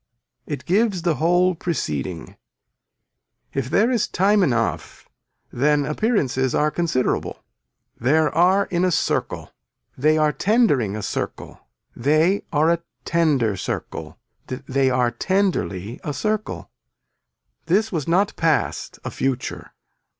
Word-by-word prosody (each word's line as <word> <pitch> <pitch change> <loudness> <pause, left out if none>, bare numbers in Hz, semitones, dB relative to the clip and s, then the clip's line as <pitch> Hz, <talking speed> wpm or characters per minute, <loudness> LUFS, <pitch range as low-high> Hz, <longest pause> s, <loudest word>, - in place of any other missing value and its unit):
It 145 - -5
gives 195 -1 +1
the 170 -5 +1
whole 175 +2 +3
preceding. 90 - -4 1.2
If 135 -2 -2
there 225 - +3
is 235 -4 +1
time 200 +3 +2
enough 120 -9 -1 0.5
then 145 +2 +2
appearances 140 - 0
are 150 0 +2
considerable. 160 -8 -1 0.6
There 150 +5 +2
are 185 +4 +4
in 175 0 -1
a 185 - +3
circle. 175 - -1 0.4
They 155 +4 +2
are 155 -1 +3
tendering 150 - +2
a 110 - -5
circle. - - -5 0.3
They 155 +9 +2
are 155 +2 +3
a 170 0 0 0.2
tender 145 -11 +2
circle. 95 - -5 0.3
They 135 +1 0
are 125 -1 +1
tenderly 130 - -1
a 150 - -4
circle. 215 +6 -3 1.0
This 210 +6 +2
was 160 -7 -3
not 190 +4 +2
past 165 -3 0
a - - -3
future. 130 -2 -3
155 Hz, 120 wpm, -22 LUFS, 130-185 Hz, 1.2 s, are